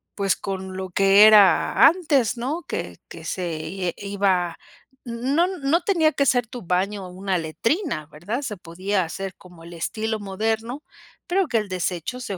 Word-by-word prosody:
pues 200 -1 +1
con 190 -1 -5
lo 190 0 -5
que 195 +3 +6
era 210 -3 +6
antes, 290 - +2
¿no? 275 +8 -3
Que 90 - -5
que 165 - -10
se, 175 -1 -3 0.3
eh, - - -5
iba 195 -4 0 0.5
No 260 +8 +1
no 335 -3 0
tenía 335 -5 +3
que 280 - +1
ser 245 -2 +3
tu 245 +2 -8
baño 185 +2 -1
una 190 +1 -2
letrina, 230 - -2
¿verdad? 175 - -5
Se 235 -6 -4
podía 185 +3 -2
hacer 190 +3 -5
como 175 -2 -16
el 170 +1 -11
estilo 220 +6 -3
moderno 220 +7 -3 0.4
pero 380 0 +1
que 240 - +1
el 210 -2 -2
desecho 185 +5 -3
se 205 -6 -5
200 Hz, 165 wpm, -23 LUFS, 185-250 Hz, 0.5 s, que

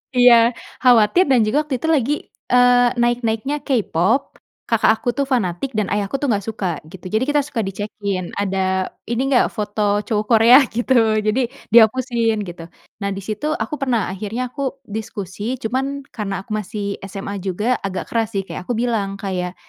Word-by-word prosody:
Iya 245 -1 +7 0.5
khawatir 250 - +5
dan 245 -5 +4
juga 260 +8 +2
waktu 295 -4 -3
itu 320 - -4
lagi, 275 0 +1 0.4
eee, 245 0 +5
naik-naiknya 240 +3 0
K-pop, 230 - 0 0.2
kakak 230 -2 +2
aku 245 - 0
tuh 280 +1 -1
fanatik 205 -2 0
dan 215 - +2
ayahku 205 +5 -1
tuh 290 - -3
nggak 200 -3 0
suka 190 -7 -3
gitu. 185 +2 -13
Jadi 220 +4 +2
kita 290 0 +3
suka 240 -6 -3
dicekin, 200 -1 -4
ada 190 -1 0 0.2
ini 235 +1 0
nggak 245 - +4
foto 205 -1 0
cowok 215 -3 -1
Korea 230 +2 +7
gitu 240 +3 0 0.3
jadi 215 +5 +1 0.3
dihapusin 230 -1 +4
gitu. 170 -2 -8 0.4
Nah - - 0
di 195 - -6
situ, 215 +9 -3
aku 300 - -3
pernah 235 -8 0
akhirnya 220 +6 -4
aku 275 0 -4
diskusi 210 +2 -5
cuman 270 +5 -2
karena 195 -3 -3
aku - - -6
masih 205 -1 -4
SMA 200 +1 -6
juga 210 +7 0
agak 190 -1 -4
keras 225 -1 0
sih - - +1
kayak 180 - -7
aku 245 - +1
bilang 225 -5 -1
kayak, 180 -3 -3
220 Hz, 170 wpm, -20 LUFS, 200-250 Hz, 0.5 s, Iya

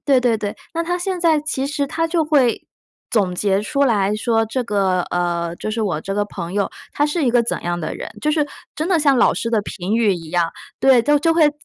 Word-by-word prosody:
对 270 -3 +4
对 240 -3 +2
对， 205 -1 -4 0.2
那 335 - 0
它 355 +1 -1
现 370 0 -2
在 320 -3 +3
其 275 -3 -2
实 285 0 -1
它 330 +4 -1
就 325 -1 +1
会 275 -7 +2 0.4
总 195 -5 +1
结 195 +1 +1
出 280 +5 -2
来 210 -6 +2
说， 225 +1 +1
这 250 +3 -2
个， 195 -4 +1
呃， 170 -1 -1
就 215 - -4
是 225 +1 -2
我 180 -7 -1
这 195 - -5
个 205 0 +1
朋 175 -4 -6
友， 200 0 0 0.2
他 290 - +1
是 300 0 -1
一 245 - +3
个 240 0 +4
怎 235 - -3
样 175 0 -2
的 155 - -4
人， - - -6
就 300 - +1
是 300 -1 +1 0.3
真 310 +3 -1
的 360 -4 +3
像 280 -3 +3
老 - - +5
师 230 - -2
的 225 -3 +2
评 200 +2 -3
语 220 -4 +3
一 165 -2 -8
样。 175 -2 +1 0.3
对， 265 -2 +5
就 295 +4 +3
会 310 -3 +5
235 Hz, 260 characters per minute, -20 LUFS, 195-295 Hz, 0.4 s, 老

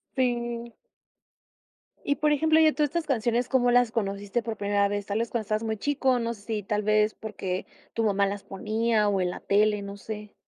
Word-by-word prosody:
Sí. 240 -2 -1 1.3
Y, 285 - +1
por 300 0 +1
ejemplo, 315 +2 +4
y 315 -1 +6
todas 300 -2 +1
estas 340 +1 -2
canciones, 240 -2 0
¿cómo 245 -2 +3
las 245 -2 +4
conociste 205 0 -2
por 225 -2 -4
primera 200 0 +2
vez? 205 0 -3
¿Tal 205 +2 -1
vez 230 0 -1
cuando 235 -2 -2
estabas 215 +2 -1
muy 220 -1 -2
chico? 265 -1 +1
No 235 0 -2
sé, 205 - -15
si 210 0 -3
tal 210 +2 -1
vez, 215 0 +3
¿porque, 190 -4 -4 0.3
tu 230 - 0
mamá 200 -2 +2
las 200 0 -3
ponía 215 +2 0
o 195 -2 +1
en 180 - +1
la - - -7
tele? 210 0 +2
No 200 0 -7
sé. 210 0 -8
220 Hz, 205 wpm, -27 LUFS, 205-245 Hz, 1.3 s, y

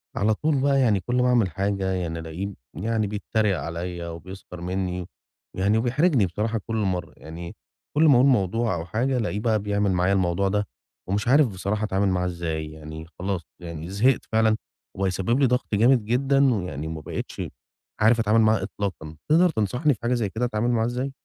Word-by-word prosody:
على 110 +2 +2
طول 150 +3 0
بقى 140 0 +3
يعني 110 -7 +3
كل 120 +6 -3
ما 125 0 +3
أعمل 120 -6 +3
حاجة 95 +2 -1
يعني 85 -3 -2
ألاقيه 85 +5 -5 0.2
يعني 110 +3 0
بيتّريق 105 -2 0
عليّا 85 +3 -5
وبيسْخر 90 +1 -9
منّي 90 0 -2 0.5
يعني 100 +3 +2
وبيحرجني 125 - +3
بصراحة 105 +6 -2
كل 115 - -2
مرّة. 90 -7 -1
يعني 85 +2 -8 0.4
كل 155 - +5
ما 150 -4 +7
أقول 125 +2 +5
موضوع 115 -4 +2
أو 80 -1 -4
حاجة، 125 +8 0
ألاقيه 105 -3 -1
بقى 110 -1 +1
بيعمل 100 -1 0
معايا 90 +1 +2
الموضوع 95 0 +1
ده 105 0 0 0.4
ومش 105 +4 -1
عارف 140 +2 +5
بصراحة 100 +1 -3
أتعامل 100 -1 +1
معاه 90 -1 +1
إزاي، 80 -3 -3
يعني 80 +1 -9
خلاص 95 -1 -2 0.2
يعني 85 -1 -7
زهقت 115 +7 +2
فعلًا 110 0 +3 0.4
وبقى 95 0 0
يسبِّب 95 +7 0
لي 140 - +5
ضَغْط 125 -3 0
جامد 120 +2 +4
جدًا 135 +3 +3
ويعني 80 -8 -3
وما 80 -1 -5
بقيتش - - -5 0.6
عارف 115 +2 +5
أتعامل 110 0 +3
معاه 110 -3 +3
إطلاقًا. 85 -7 -5
تقدر 170 +4 +5
تنصحني 125 - +1
في 110 - -11
حاجة 120 +1 +1
زي 115 -5 0
كده 115 +5 -1
أتعامل 110 +1 0
معاه 115 -2 +2
إزاي؟ 125 +3 -2
100 Hz, 185 wpm, -25 LUFS, 90-120 Hz, 0.6 s, ما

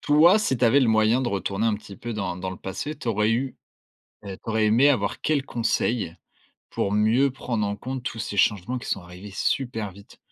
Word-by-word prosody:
toi, 165 +8 +5
si 135 -11 0
tu 125 - +2
avais 130 +5 +5
le 125 - +3
moyen 110 +2 +3
de 125 - -1
retourner 100 +1 -1
un 105 - +1
petit 100 -1 -12
peu 120 +3 -6
dans 95 -4 -3
dans 95 +1 -4
le 95 - -7
passé, 100 +11 -5
tu 125 - -10
aurais 105 -1 +2
eu 125 +3 -1 0.7
heu, 100 -1 -6
tu - - -14
aurais 110 -1 +2
aimé 120 +7 +5
avoir 110 -8 0
quel 145 -3 +1
conseil, 115 -6 -1 0.6
pour 100 - -1
mieux 110 +7 +3
prendre 120 -4 -2
en 100 - -3
compte 130 +4 -5
tous 115 - -5
ces 105 - -4
changements 105 +4 +1
qui 120 - -9
sont - - -1
arrivés 90 +3 -11
super 110 0 -2
vite? 100 +2 -16
110 Hz, 220 wpm, -25 LUFS, 100-130 Hz, 0.7 s, toi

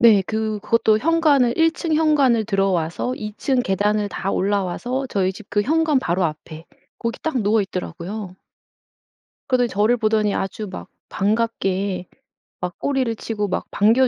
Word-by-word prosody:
네. 215 -4 +7
그 220 -1 -2
그것도 220 -1 +3
현관을 295 -5 +3
1 325 0 +4
층 325 -2 -2
현관을 285 -8 +3
들어와서 195 +1 0
2 210 -3 -6
층 260 -3 +1
계단을 205 +1 +1
다 195 0 -3
올라와서 205 +7 -1
저희 190 -5 0
집 200 +1 -13
그 205 0 +2
현관 310 +1 +2
바로 180 -5 0
앞에 155 +1 -5 0.3
거기 230 0 -3
딱 315 -5 -1
누워 210 +1 +3
있더라고요. 185 +1 -6 1.1
그러더니 250 -2 +2
저를 215 +4 +2
보더니 215 -2 +1
아주 195 +2 -3
막 - - -8 0.2
반갑게 195 -3 -1 0.5
막 180 -1 -4
꼬리를 260 -5 0
치고 210 -2 -3
막 185 - -2
반겨 230 +6 +4
215 Hz, 295 characters per minute, -21 LUFS, 195-250 Hz, 1.1 s, 네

